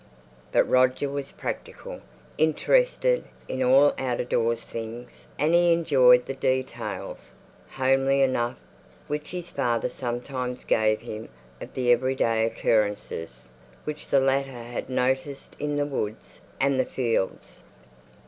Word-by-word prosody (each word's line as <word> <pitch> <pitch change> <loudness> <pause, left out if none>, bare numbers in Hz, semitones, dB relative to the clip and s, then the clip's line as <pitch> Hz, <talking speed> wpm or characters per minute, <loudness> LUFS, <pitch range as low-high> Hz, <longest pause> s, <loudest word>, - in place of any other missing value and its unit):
But - - +4
Roger 130 +2 +3
was 140 0 -5
practical; - - -6 0.4
interested - - +2 0.2
in 130 - -3
all 135 +3 +5
out 125 -2 -1
of 125 - -3
doors 115 0 +1
things, 115 +2 -8
and 155 +3 +2
he 175 0 +5
enjoyed 130 -7 +5
the 135 - -4
details, 130 -1 -3 0.4
homely 135 +1 +2
enough, 120 -2 0 0.5
which 150 0 -4
his 175 -1 -6
father 120 -1 0
sometimes 125 0 -4
gave 110 -1 +2
him 110 +1 -7 0.3
of - - -9
the 125 -1 +2
every 130 +2 +2
day 115 -2 +2
occurrences 105 - -1 0.3
which 150 0 -6
the 140 - +4
latter 135 -2 0
had 120 +2 -6
noticed 130 +2 -1
in 145 0 -2
the 145 0 +1
woods 110 -7 -5 0.2
and 135 0 +2
the 130 - +3
fields. 115 -7 -2
130 Hz, 130 wpm, -26 LUFS, 120-140 Hz, 0.5 s, all